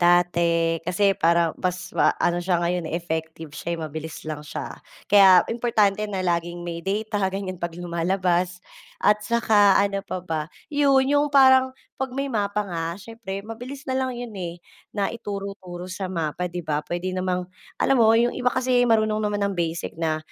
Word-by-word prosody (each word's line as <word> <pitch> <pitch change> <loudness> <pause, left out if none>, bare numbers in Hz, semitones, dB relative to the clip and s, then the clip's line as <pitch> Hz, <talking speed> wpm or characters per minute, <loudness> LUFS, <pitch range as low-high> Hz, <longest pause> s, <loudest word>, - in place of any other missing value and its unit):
dati. 170 -1 +3
Kasi 195 +3 +2
parang 170 -1 +2
mas 185 0 -3
maano 175 0 +2
siya 175 -1 +1
ngayon 175 -1 -1
eh, 165 - -1
effective 160 -2 -5
siya, 170 +2 -4
mabilis 155 0 -6
lang 155 -1 -5
siya. 150 - -7 0.3
Kaya 190 -3 +7
importante 215 -4 +1
na 190 -2 -2
laging 175 0 -1
may 170 -1 -5
data, 205 +2 -2
ganiyan, 190 -1 -4
'pag 170 0 -4
lumalabas 175 +1 0 0.4
at 210 0 +3
saka 210 -3 +4
ano 200 0 +1
pa 190 - -5
ba? 160 -1 -3 0.2
Yun, 275 -2 +4
yung 290 +1 +3
parang 260 -2 +6 0.2
'pag 265 -1 -3
may 275 +2 -2
mapa 210 -4 -1
nga, 170 -1 -4
siyempre 205 -2 -7
mabilis 250 +6 -8
na 260 - -1
lang 260 0 0
yun 240 -3 -7
eh 175 -3 -5 0.3
na 200 -2 -1
ituro-turo 195 -5 -6
sa 185 0 -5
mapa, 170 0 -2
'di 175 -1 -6
ba? 150 -1 0
Puwede 175 +4 -3
namang 185 -1 -1 0.3
alam 270 - +3
mo 230 -4 +5
yung 240 +1 +2
iba 250 0 +1
kasi 255 -1 +2
marunong 215 -1 +2
naman 205 -1 -1
ng 200 - -3
basic 170 -1 -3
na, 160 -1 -1
185 Hz, 170 wpm, -24 LUFS, 170-215 Hz, 0.4 s, Kaya